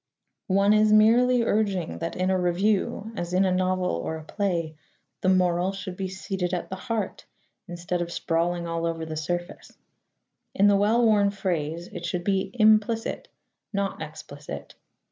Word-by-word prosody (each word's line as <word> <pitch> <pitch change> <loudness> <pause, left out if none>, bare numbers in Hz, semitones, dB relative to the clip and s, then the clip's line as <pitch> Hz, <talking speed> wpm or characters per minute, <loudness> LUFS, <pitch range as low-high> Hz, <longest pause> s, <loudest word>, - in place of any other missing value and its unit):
One 200 +1 +4
is 215 0 +4
merely 235 +3 +5
urging 200 -6 0
that 165 0 -4
in 185 +1 0
a 185 - +2
review, 195 +4 0
as 175 -2 -4
in 190 +1 +4
a 185 - +2
novel 185 0 +1
or 85 - -2
a 160 - -9
play, 170 -3 -2 0.5
the 185 - +2
moral 180 0 +2
should 195 -1 -6
be 190 0 -3
seated 190 -1 -3
at 180 - -5
the - - -2
heart 215 +1 -4 0.4
instead 175 0 -3
of 170 0 -3
sprawling 170 +1 -1
all 165 0 -2
over 165 -1 -3
the 160 0 -5
surface. 175 +3 -5 0.8
In 200 - +4
the 205 -1 +6
well 220 +4 +3
worn 205 -2 +4
phrase 170 -4 -2
it 175 -4 -8
should 175 0 -2
be 195 0 0
implicit, 220 0 +2 0.5
not 200 -4 -2
explicit. 150 -2 -8
185 Hz, 165 wpm, -26 LUFS, 170-205 Hz, 0.8 s, the